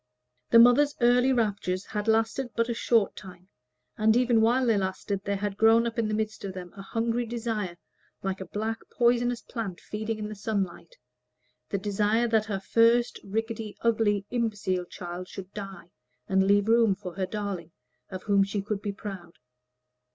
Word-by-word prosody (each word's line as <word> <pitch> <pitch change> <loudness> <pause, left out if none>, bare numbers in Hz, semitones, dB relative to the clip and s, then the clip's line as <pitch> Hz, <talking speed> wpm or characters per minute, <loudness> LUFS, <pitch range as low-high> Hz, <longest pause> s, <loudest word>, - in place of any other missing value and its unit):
The 230 - +6
mother's 245 +5 +6
early 245 +2 +4
raptures 200 -6 0
had 210 0 -4
lasted 225 +3 +1
but 230 +1 +1
a - - +1
short 230 -2 +2
time, 185 -1 -12 0.5
and 220 +2 +4
even 245 -2 +3
while 245 +3 +3
they 230 -2 +3
lasted 195 0 -2
there 200 0 -1
had 200 0 -3
grown 225 +1 +5
up 235 0 -2
in 225 - +1
the 215 - -1
midst 220 0 -3
of 195 -1 -4
them 180 -1 -8
a 195 - -8
hungry 230 +4 -1
desire, 225 -6 -3 0.5
like 195 0 -2
a - - -4
black 220 +4 -3
poisonous 240 0 +1
plant 215 -7 -5
feeding 215 +1 -4
in 210 -1 -4
the 215 - -6
sunlight, 200 - -3 0.7
the 200 - -1
desire 210 +4 +1
that 220 -1 +2
her 205 -3 -3
first, 230 +4 +3
rickety, 225 +1 -4
ugly, 215 -3 +2
imbecile 210 -6 -1
child 175 +1 -7
should 190 +1 -9
die, 195 -4 -8 0.4
and 190 0 +2
leave 200 +1 +4
room 225 -3 +4
for 185 -3 -8
her 190 0 -2
darling, 195 -5 -4 0.4
of 185 -1 -7
whom 200 -1 +3
she 200 +1 -2
could 205 -1 -3
be 205 - -2
proud. 195 -5 -8
210 Hz, 175 wpm, -27 LUFS, 195-230 Hz, 0.7 s, The